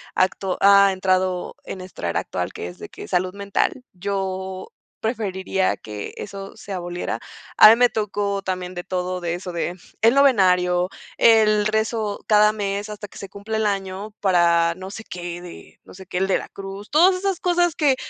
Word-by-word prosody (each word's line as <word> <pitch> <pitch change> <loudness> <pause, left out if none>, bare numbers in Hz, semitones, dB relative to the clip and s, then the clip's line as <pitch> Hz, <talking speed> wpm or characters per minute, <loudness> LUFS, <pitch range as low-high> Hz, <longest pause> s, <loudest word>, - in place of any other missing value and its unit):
a - - +5
acto 190 0 -2
ha 200 0 +7
entrado 185 -1 0
en 190 - -6
esta 185 - -6
era - - 0
actual, - - -4
que 85 - -6
es 90 - -12
de - - -8
que - - -10
es - - -11
salud 185 0 +1
mental. 200 +5 -1
Yo 190 0 -4 0.3
preferiría 195 -4 -1
que 105 -1 -7
eso 195 0 -8
se 200 - -8
aboliera. 175 -1 -4 0.4
A - - +11
mí 225 - +8
me 245 +1 +4
tocó 205 -2 -2
también 185 -1 -3
de 175 - -5
todo, 180 0 -3
de 170 -1 -2
eso 180 0 -6
de 170 +1 -3 0.3
el 230 +4 +5
novenario, 180 -9 +4 0.3
el 215 -2 +5
rezo 220 -1 -1
cada 210 0 +5
mes 205 0 -3
hasta 210 0 -7
que - - -15
se 195 - -8
cumpla 200 +3 -5
el 220 - 0
año 195 +1 -3
para 170 -3 +3
no 185 +1 -8
sé 220 - -8
qué, 175 -3 -7
de 175 -1 -12
no - - -15
sé 190 0 -11
qué, 180 - -4
el 190 - +1
de 190 - +2
la - - -9
cruz, 195 +1 -8
todas 355 +5 +5
esas 385 -1 -1
cosas 350 -2 +1
que 285 -4 +3
195 Hz, 195 wpm, -22 LUFS, 185-215 Hz, 0.4 s, A